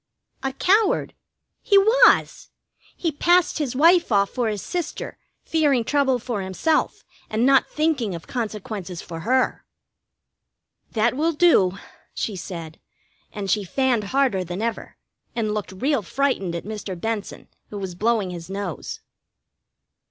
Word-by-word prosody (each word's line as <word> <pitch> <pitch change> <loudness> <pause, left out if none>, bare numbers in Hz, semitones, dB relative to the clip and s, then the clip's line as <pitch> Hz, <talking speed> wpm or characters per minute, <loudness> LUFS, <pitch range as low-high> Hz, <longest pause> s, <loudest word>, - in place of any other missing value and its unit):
"A 270 - -1
coward. 395 +8 +2 0.5
He 400 - +4
was! 465 +5 +4 0.5
He 330 - -1
passed 345 +3 +3
his 275 -5 -2
wife 335 +2 +5
off 200 -1 +3
for 245 -3 -1
his 210 -2 -4
sister, 345 -4 -4 0.3
fearing 290 -7 +2
trouble 270 0 +2
for 240 -4 -4
himself, 190 - 0 0.3
and 220 +3 +1
not 270 0 +4
thinking 290 - 0
of 165 - -9
consequences 210 -6 -5
for 165 -1 -7
her." 255 +9 +1 1.3
"That 230 +2 +2
will 320 +4 +1
do," 245 - +4 0.4
she 215 - -2
said, 170 -3 -7 0.5
and 200 -3 -3
she 210 - +1
fanned 245 +2 0
harder 255 -5 +1
than 175 +1 -5
ever, 230 -1 -4 0.4
and 215 -3 -1
looked 210 -3 -4
real 260 +7 0
frightened 200 -5 -1
at 170 - -5
Mr. 205 -4 -6
Benson, 220 0 -4 0.2
who 210 - -7
was 190 -2 -5
blowing 210 0 0
his 170 0 -8
nose. 195 -3 -5
230 Hz, 135 wpm, -23 LUFS, 195-285 Hz, 1.3 s, wife